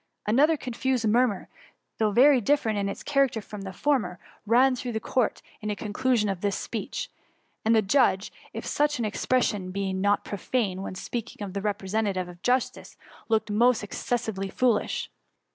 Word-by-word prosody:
Another 290 +9 +4
confused 255 -2 -1
murmur, 230 -2 +2 0.5
though 215 -1 +2
Tery 255 +2 +6
dif 290 +7 +3
ferent 220 -2 0
in 200 -1 -1
its - - -6
character 275 -5 +2
from 210 -1 -9
the 195 -1 -6
former, 210 -5 0 0.3
ran 255 +4 +5
through 245 -1 -4
the 220 - -1
court 240 +1 0 0.2
on 210 - -3
the 210 - -1
conclusi<m 215 +1 0
of 190 -2 -5
this 200 -1 0
speech; - - -4 0.5
and 225 +1 +4
the 220 - +4
judge, 200 -2 +2 0.2
if - - -6
such 295 0 +1
an 235 - -1
expression 210 -3 0
be 195 0 -2
not 200 +2 +1
profane 200 -1 -2
when 190 - -5
spealdng 235 +5 -5
o£ 200 -4 -6
a 200 - -1
refM'esentative 200 -2 -1
of 175 0 -12
justice, 250 +1 -1 0.3
looked 220 -1 +1
most 235 +2 +3
excesdvely 205 -2 -3
foolish. 245 -4 0
220 Hz, 170 wpm, -26 LUFS, 200-250 Hz, 0.5 s, Tery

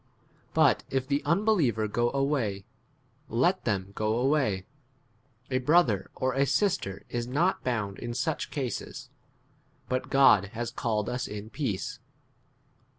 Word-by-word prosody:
But - - +4
if 130 -1 -1
the 140 +1 +1
unbeliever 165 - +2
go 120 +3 +1
away, 135 -8 -1 0.6
let 155 - +1
them 100 -3 -1
go 110 +2 0
away; 125 -8 +1 0.9
a 130 - +2
brother 125 - +3
or 130 0 0
a 135 +1 +2
sister 150 - 0
is 120 0 -3
not 160 +9 +1
bound 105 -6 -2
in 120 -1 -5
such 160 +4 -1
[cases], 135 -5 -5 0.8
but 130 0 -1
God 135 -8 +6
16 105 +3 -14
has 120 0 -2
called 110 -3 -1
us 125 +1 -2
in 105 +1 -7
peace. 130 -10 -3
125 Hz, 135 wpm, -28 LUFS, 105-140 Hz, 0.9 s, God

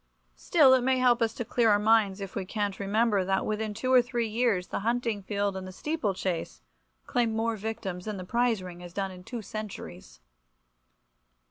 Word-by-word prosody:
Still, 290 -6 +5
it 260 - +4
may 260 +1 +2
help 250 -1 +3
us 225 -1 +2
to 240 - -4
clear 235 0 +2
our 205 - +5
minds 210 -2 +3
of 195 -1 -6
cant 205 -1 -1
if - - -15
we 200 - -3
remember 210 -1 +2
that 190 +1 0
within 215 0 -2
two 255 +4 0
or 255 - +8
three 240 -2 -2
years 220 -4 +1
the - - -2
hunting 230 -1 -1
field 200 0 -1
and 190 0 -5
the - - -7
steeple 225 - -2
chase 165 - -3 0.4
claim 230 -2 0
more 225 0 0
victims 200 -4 -5
than 215 -2 -4
the 185 - -6
prize 235 -1 +1
ring 180 -1 -9
has 175 -1 -10
done 195 0 -2
in 180 -1 -11
two 235 +2 -6
centuries. 90 - -8
215 Hz, 205 wpm, -28 LUFS, 190-235 Hz, 0.4 s, or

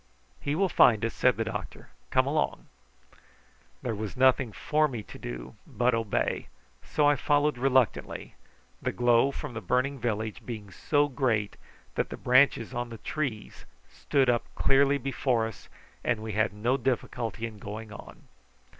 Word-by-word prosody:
"He 145 +1 -2
will 195 +3 +2
find 115 - +5
us," 115 - -2
said - - +3
the - - +1
doctor. - - -6 0.2
"Come - - +3
along." - - -1 1.2
There 120 - -1
was 110 +3 -5
nothing 130 -2 +4
for 155 +7 +1
me 120 -6 -5
to - - -12
do - - -7
but 125 +1 +1
obey, 115 -3 -1 0.3
so 150 -1 +1
I 145 - +5
followed 145 -1 +1
reluctantly, 130 -3 +1 0.5
the - - -1
glow 120 +2 +3
from 140 -1 -6
the 115 - -5
burning 130 +7 0
village 110 -2 -2
being 105 -5 -7
so 145 - +1
great 120 -7 0 0.4
that - - -1
the - - -6
branches 130 -2 +3
of 120 -1 -3
the 115 - -8
trees 125 -5 -4 0.3
stood 135 -2 +1
up 120 -1 +2
clearly 140 +1 +4
before 130 -3 0
us, 110 - -9 0.3
and 115 -3 0
we 110 - -4
had 110 +2 +1
no 115 +6 0
difficulty 120 -3 -2
in 110 -2 -8
going 105 +1 -7
on. 105 - -12
120 Hz, 160 wpm, -28 LUFS, 110-135 Hz, 1.2 s, find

